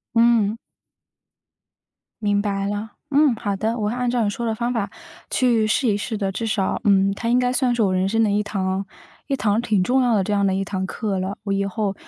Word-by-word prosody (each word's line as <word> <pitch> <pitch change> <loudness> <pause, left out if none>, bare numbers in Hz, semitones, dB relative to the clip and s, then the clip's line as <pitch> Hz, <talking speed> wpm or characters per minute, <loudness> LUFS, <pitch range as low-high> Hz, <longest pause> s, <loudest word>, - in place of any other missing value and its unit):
嗯。 230 -2 +4 1.7
明 205 -1 +2
白 200 -1 -1
了， 205 +1 -4 0.2
嗯， 280 -3 +4
好 200 -2 -2
的， 220 +4 -1
我 210 -2 -1
会 235 - -3
按 250 -1 0
照 240 -2 +1
你 205 - +1
说 235 +3 -4
的 220 -1 -1
方 240 +2 -1
法 205 -4 -1 0.4
去 235 -4 +2
试 240 +4 +1
一 205 -1 +2
试 220 +1 -3
的， 195 -2 -1
至 225 +4 -3
少， 195 -3 -1
嗯， 195 -1 +4
它 230 +3 -3
应 245 - +4
该 250 0 +2
算 255 -1 +1
是 235 - 0
我 190 -2 +1
人 185 +1 +1
生 225 +2 +2
的 205 - +2
一 205 +1 +2
堂 195 -1 -2 0.4
一 275 - 0
堂 210 -2 +1
挺 210 -6 +1
重 260 +6 +2
要 245 -3 +3
的 195 - +2
这 210 - -3
样 200 -1 +2
的 190 - +1
一 195 - 0
堂 190 -1 -3
课 195 -1 -3
了， 190 +2 -3
我 200 - -3
以 200 0 0
后 200 0 -2
210 Hz, 255 characters per minute, -22 LUFS, 195-235 Hz, 1.7 s, 嗯